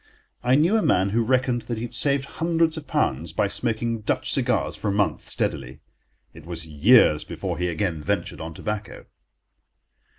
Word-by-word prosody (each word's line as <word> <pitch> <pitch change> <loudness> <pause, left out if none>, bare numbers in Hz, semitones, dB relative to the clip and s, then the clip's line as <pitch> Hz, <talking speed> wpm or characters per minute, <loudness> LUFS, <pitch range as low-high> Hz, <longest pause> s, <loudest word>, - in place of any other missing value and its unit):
I 125 +1 +3
knew 170 +10 +3
a - - +2
man 95 - +2
who 115 +3 +1
reckoned 125 0 +1
that 120 - -2
he 110 - -4
had 120 - -6
saved 140 +2 +2
hundreds 165 +1 0
of - - -8
pounds 80 +5 0
by 100 - 0
smoking 115 +2 -1
Dutch 105 - 0
cigars - - +1
for - - -5
a - - +2
month 100 0 -1
steadily. - - -3 0.5
It 80 - -13
was 85 -1 -4
years 80 - +4
before - - -5
he 90 - 0
again 85 -2 -2
ventured 95 0 -2
on 80 0 -7
tobacco. 105 +1 -5
105 Hz, 175 wpm, -24 LUFS, 85-125 Hz, 0.5 s, years